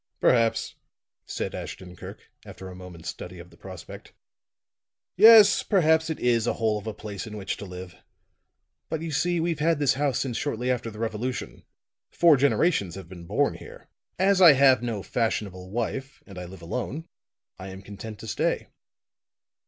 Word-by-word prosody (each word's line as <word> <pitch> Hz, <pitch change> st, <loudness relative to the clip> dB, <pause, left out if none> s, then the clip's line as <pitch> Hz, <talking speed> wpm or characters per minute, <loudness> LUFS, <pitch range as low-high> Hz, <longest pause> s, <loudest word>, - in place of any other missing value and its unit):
"Perhaps," 115 Hz, -2 st, +2 dB, 0.5 s
said -, -, -4 dB
Ashton 90 Hz, -1 st, -8 dB
Kirk, -, -, -10 dB, 0.2 s
after 95 Hz, -, -10 dB
a 90 Hz, -, -10 dB
moment's 90 Hz, -3 st, -9 dB
study 90 Hz, +2 st, -8 dB
of 85 Hz, +1 st, -12 dB
the -, -, -17 dB
prospect, 95 Hz, -3 st, -11 dB, 1.0 s
"yes, 215 Hz, 0 st, +8 dB
perhaps 160 Hz, -4 st, +2 dB
it 160 Hz, -, -3 dB
is 120 Hz, -2 st, +2 dB
a -, -, +2 dB
hole 110 Hz, -2 st, 0 dB
of 105 Hz, -, -11 dB
a 110 Hz, -, -3 dB
place 105 Hz, -1 st, -7 dB
in 105 Hz, -1 st, -7 dB
which 95 Hz, -2 st, -3 dB
to 100 Hz, -, -8 dB
live. 90 Hz, -2 st, -9 dB, 0.9 s
But 160 Hz, 0 st, -3 dB
you 165 Hz, -, -4 dB
see 175 Hz, +4 st, +1 dB
we've 165 Hz, -2 st, -1 dB
had 165 Hz, +1 st, +2 dB
this 145 Hz, -2 st, +2 dB
house 140 Hz, 0 st, 0 dB
since 125 Hz, -4 st, -2 dB
shortly 125 Hz, -3 st, -1 dB
after 120 Hz, -2 st, -2 dB
the 105 Hz, -, -11 dB
Revolution; 115 Hz, +3 st, -4 dB, 0.4 s
four 170 Hz, -3 st, +5 dB
generations 135 Hz, -, +1 dB
have 95 Hz, -3 st, -10 dB
been 85 Hz, -2 st, -11 dB
born -, -, +1 dB
here. -, -, -13 dB, 0.3 s
As 190 Hz, +1 st, +3 dB
I 170 Hz, -5 st, +10 dB
have 135 Hz, -2 st, +5 dB
no 115 Hz, -5 st, -3 dB
fashionable 100 Hz, -6 st, -2 dB
wife 120 Hz, +5 st, -4 dB
and 95 Hz, -3 st, -10 dB
I 90 Hz, -, -6 dB
live 90 Hz, -1 st, -12 dB
alone, 135 Hz, -, -4 dB, 0.5 s
I 95 Hz, -, -7 dB
am 95 Hz, 0 st, -9 dB
content 105 Hz, +2 st, -9 dB
to 110 Hz, -, -9 dB
stay. -, -, -1 dB
115 Hz, 175 wpm, -26 LUFS, 95-145 Hz, 1.0 s, I